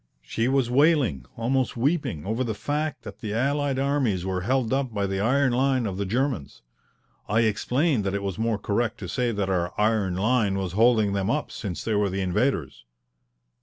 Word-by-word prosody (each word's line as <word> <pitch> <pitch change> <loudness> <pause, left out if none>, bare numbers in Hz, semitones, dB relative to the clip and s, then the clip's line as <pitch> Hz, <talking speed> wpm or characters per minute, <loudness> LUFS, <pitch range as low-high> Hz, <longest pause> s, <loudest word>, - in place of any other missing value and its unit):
She 115 - -1
was 135 -2 +2
wailing, 125 - +2
almost 125 +2 0
weeping, 130 - 0
over 110 +5 -1
the 110 -4 -3
fact 150 +5 -3
that 105 -1 -9
the 105 -1 -4
allied 140 +2 0
armies 135 -10 0
were 95 -1 -1
held 125 +3 0
up 135 -2 0
by 100 -2 -1
the 95 0 -2
iron 130 +4 +2
line 130 -1 +2
of 95 -3 -3
the 100 -1 -2
Germans. 120 - -2 0.7
I 110 +3 +3
explained 125 +4 +1
that 100 0 -1
it 100 - -2
was 100 -1 -3
more 115 -1 +1
correct 110 +3 -1
to - - -5
say 125 -2 0
that 100 -3 -1
our 90 -2 0
iron 105 -4 +2
line 105 0 +1
was 95 -2 -2
holding 110 0 +3
them 100 +1 -1
up, 150 +4 -1
since 100 -8 -5
they 110 - -1
were 105 -1 +2
the 95 +1 -2
invaders. 90 - -1
115 Hz, 195 wpm, -25 LUFS, 100-130 Hz, 0.7 s, I